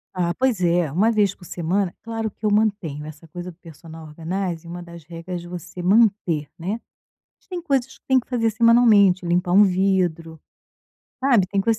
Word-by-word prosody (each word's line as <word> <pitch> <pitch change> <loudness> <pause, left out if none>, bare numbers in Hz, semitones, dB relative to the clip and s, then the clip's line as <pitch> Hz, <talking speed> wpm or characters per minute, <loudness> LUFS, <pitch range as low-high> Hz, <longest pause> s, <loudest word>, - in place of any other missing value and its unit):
Ah, 175 -1 0
pois 255 -5 0
é. 170 -3 +2
1 205 +9 +2
vez 205 -4 +2
por 190 - -19
semana 180 +2 -2
claro 225 -1 -3
que 215 +1 -9
eu 210 - +2
mantenho, 200 -9 0
essa 155 +1 -11
coisa 175 +2 -8
do 165 - -22
personal 165 -1 -12
organizing, 170 +2 -4
uma 175 +1 -7
das 170 -2 -12
regras 170 +2 -7
você 175 0 -8
manter, 190 -6 +2
né. 195 +7 -3 0.6
Mas - - -34
tem 355 -2 -5
coisas 265 -4 -1
que - - -57
tem 265 -1 +4
que 245 - -6
fazer 230 -3 +1
semanalmente, 220 -5 +4
limpar 175 +1 0
um 200 +3 +7
vidro, 180 -4 0 0.8
sabe, 245 -8 +3
tem 200 - 0
coisa, 225 +2 +1
185 Hz, 185 wpm, -22 LUFS, 170-220 Hz, 0.8 s, um